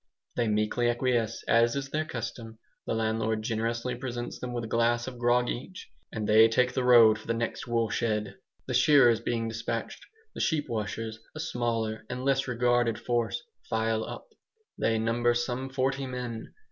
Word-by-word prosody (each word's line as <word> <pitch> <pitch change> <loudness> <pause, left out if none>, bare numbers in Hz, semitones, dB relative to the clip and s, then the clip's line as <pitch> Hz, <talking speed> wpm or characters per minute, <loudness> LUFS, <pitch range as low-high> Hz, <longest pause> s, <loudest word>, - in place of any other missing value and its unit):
They 120 -2 +1
meekly 105 +3 +1
acquiesce, 120 -2 0
as 115 +1 +4
is 135 -1 -3
their 155 +1 -1
custom. 115 -4 -6 0.3
The - - 0
landlord 110 0 0
generously 115 +2 -1
presents 120 -1 -5
them 125 - -5
with 120 -1 -3
a - - -4
glass 120 +1 +1
of 125 -2 -8
grog 120 0 +3
each, 185 +12 -6 0.2
and 110 -2 -3
they 110 +1 +7
take 125 +2 +2
the 130 - 0
road 115 -3 +7
for - - -14
the 115 - 0
next 115 +2 -3
woolshed. 115 -2 0 0.6
The 130 - -4
shearers 125 -2 +5
being 115 -1 -2
despatched, 115 0 -4 0.3
the - - -5
sheep 155 -4 0
washers, 110 0 -4 0.2
a - - -6
smaller 115 -7 -2
and 125 +1 -4
less 135 -1 +2
regarded 120 -2 +2
force, 120 -4 -1 0.3
file 110 0 0
up. - - -8 0.5
They 115 - +1
number 120 +2 +1
some 125 +2 -2
forty 135 +1 -1
men. 125 -3 -5
120 Hz, 170 wpm, -28 LUFS, 115-125 Hz, 0.6 s, they